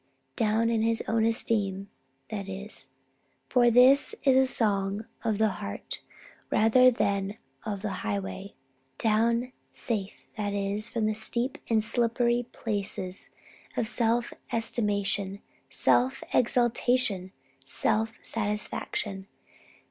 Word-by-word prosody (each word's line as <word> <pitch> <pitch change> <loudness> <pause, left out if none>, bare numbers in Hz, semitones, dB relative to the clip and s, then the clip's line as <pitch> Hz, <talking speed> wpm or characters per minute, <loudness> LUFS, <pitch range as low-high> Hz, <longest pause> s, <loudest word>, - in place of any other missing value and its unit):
Down 225 +1 +2
in 225 -1 +1
his 225 0 +1
own 225 0 +2
esteem, 205 -4 +1 0.4
that 200 -2 -4
is. 200 +3 -7 0.6
For 245 -2 +5
this 260 - +5
is 270 -2 +5
a 265 0 +5
song 200 -1 +1 0.2
of 220 -3 0
the 220 0 +3
heart 100 0 -6 0.5
rather 250 +4 +5
than 200 -3 -1 0.3
of 200 -2 -4
the 210 - -2
highway. 100 - -4 0.4
Down 230 +3 +1 0.2
safe, 210 -4 -3
that 205 -1 -2
is, 200 +2 -2
from 230 -2 -1
the 215 - +1
steep 235 +4 -2
and 220 -2 +3
slippery 235 +1 +1
places 195 -4 -4 0.5
of 225 - 0
self 235 +1 0 0.2
estimation, 205 -3 -1 0.3
self 260 +2 +2
exaltation, 240 -5 +2 0.3
self 220 +10 0
satisfaction. 205 -2 -2
220 Hz, 110 wpm, -28 LUFS, 200-235 Hz, 0.6 s, For